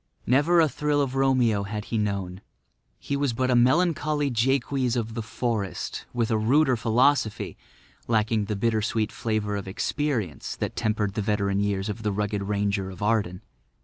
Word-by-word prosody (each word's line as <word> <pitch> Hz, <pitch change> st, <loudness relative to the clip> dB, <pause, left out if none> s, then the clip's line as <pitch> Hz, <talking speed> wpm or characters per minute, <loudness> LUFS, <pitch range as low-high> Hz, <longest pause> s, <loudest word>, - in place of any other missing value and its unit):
Never 145 Hz, +8 st, +4 dB
a 160 Hz, -, +5 dB
thrill 150 Hz, 0 st, 0 dB
of 135 Hz, -2 st, 0 dB
Romeo 130 Hz, -6 st, +2 dB
had 105 Hz, +2 st, -5 dB
he -, -, +2 dB
known; 100 Hz, -3 st, -2 dB, 0.6 s
he 140 Hz, -, -3 dB
was 140 Hz, -3 st, 0 dB
but 130 Hz, +2 st, 0 dB
a -, -, +4 dB
melancholy 150 Hz, +2 st, +2 dB
Jaques 130 Hz, +1 st, +1 dB
of 115 Hz, -2 st, -2 dB
the 115 Hz, -, -3 dB
forest 110 Hz, -3 st, -3 dB
with 120 Hz, -1 st, -1 dB
a 110 Hz, -, +2 dB
ruder 130 Hz, +4 st, +3 dB
philosophy, 120 Hz, 0 st, +1 dB, 0.5 s
lacking 110 Hz, -1 st, +1 dB
the 105 Hz, +1 st, -2 dB
bitter 110 Hz, +1 st, +1 dB
sweet 110 Hz, 0 st, -1 dB
flavour 110 Hz, -2 st, -2 dB
of 100 Hz, -1 st, -5 dB
experience 110 Hz, -, -2 dB
that -, -, -4 dB
tempered 105 Hz, -2 st, 0 dB
the 105 Hz, -, -2 dB
veteran 100 Hz, -1 st, 0 dB
years 100 Hz, -1 st, -1 dB
of 105 Hz, +1 st, -4 dB
the 105 Hz, -1 st, -1 dB
rugged 105 Hz, 0 st, -1 dB
ranger 100 Hz, -1 st, -1 dB
of 95 Hz, +1 st, -7 dB
Arden. 105 Hz, -3 st, 0 dB
110 Hz, 170 wpm, -26 LUFS, 105-130 Hz, 0.6 s, a